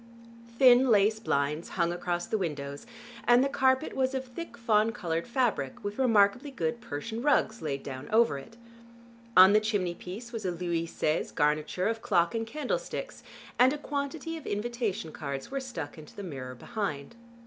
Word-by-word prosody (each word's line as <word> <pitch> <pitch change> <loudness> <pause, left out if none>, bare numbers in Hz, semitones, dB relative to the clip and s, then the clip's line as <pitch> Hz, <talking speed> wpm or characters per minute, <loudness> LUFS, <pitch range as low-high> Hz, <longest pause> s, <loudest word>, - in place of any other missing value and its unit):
Thin 255 0 +7
lace 215 0 +4
blinds 150 -5 -1
hung 170 -1 +2
across 175 0 -2
the 220 - -1
windows, 145 0 -4 0.4
and 245 +1 +6
the - - +2
carpet 260 +1 +1
was 265 0 +1
of 265 0 -2
thick 250 +1 -8
fawn 225 -1 +3
colored 170 -8 -3
fabric 235 - -1
with 205 +3 -4
remarkably 235 +2 +3
good 235 -3 -2
Persian 220 +11 -5
rugs 240 -5 +2
laid 140 -3 -3
down 130 +1 -7
over 225 -9 +3
it. 225 +11 -14 0.8
On 190 +2 +9
the 215 - +6
chimney 205 -5 -1
piece 205 +8 -8
was 225 -3 -5
a 185 - 0
Louis 170 -1 -2
Seize 155 -1 -1
garniture 155 +5 +1
of 225 0 -2
clock 175 -7 +2
and 225 -1 -2
candlesticks, - - -4 0.4
and 255 +2 +6
a - - -3
quantity 295 +3 -4
of 315 - -10
invitation 220 -4 -2
cards 140 - -5
were 275 - -1
stuck 245 - -6
into 150 - -13
the 200 - -7
mirror 130 -7 -6
behind. 180 - -4
215 Hz, 170 wpm, -29 LUFS, 165-245 Hz, 0.8 s, On